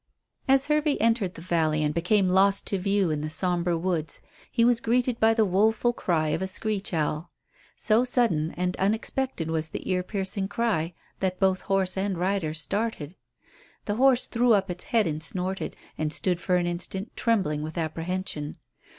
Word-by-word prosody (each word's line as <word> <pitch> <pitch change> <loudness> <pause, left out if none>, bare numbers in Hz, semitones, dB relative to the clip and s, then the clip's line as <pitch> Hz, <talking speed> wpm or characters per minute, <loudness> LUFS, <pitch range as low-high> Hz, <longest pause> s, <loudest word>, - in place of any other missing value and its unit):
As 270 0 +5
Hervey 300 -1 +2
entered 225 -6 +1
the 165 - -10
valley 160 -3 +1
and 150 0 0
became 185 +4 +2
lost 195 +2 +3
to 195 - -1
view 195 -2 +1
in 150 -1 -2
the 155 - -3
sombre 175 +1 0
woods, 165 -3 -2 0.3
he 230 -1 +3
was 240 -1 +3
greeted 245 +1 +1
by 225 0 +4
the 220 -1 +3
woeful 220 +5 +2
cry 160 -8 0
of 155 - -1
a 190 - -1
screech 205 +1 -1
owl. 155 0 -1 0.5
So 225 +2 +2
sudden 225 -11 +1
and 180 0 -1
unexpected 215 -2 -1
was 160 -1 -1
the - - -6
ear 180 -1 +1
piercing 195 0 -1
cry 195 -7 -1 0.2
that 185 -1 -1
both 190 -1 +2
horse 195 -1 +1
and 195 -1 -1
rider 180 -3 -1
started. 185 -2 -1 0.7
The 205 0 -2
horse 260 -1 +4
threw 240 0 +2
up 195 -2 +1
its 180 - -7
head 230 -8 +2
and 155 -1 -2
snorted, 185 +3 -3 0.2
and 155 -1 -1
stood 180 +1 0
for 180 - +1
an 175 -1 +1
instant 185 +4 -4
trembling 190 -11 +1
with 155 +3 -6
apprehension. 165 -1 -3
190 Hz, 175 wpm, -26 LUFS, 165-220 Hz, 0.7 s, As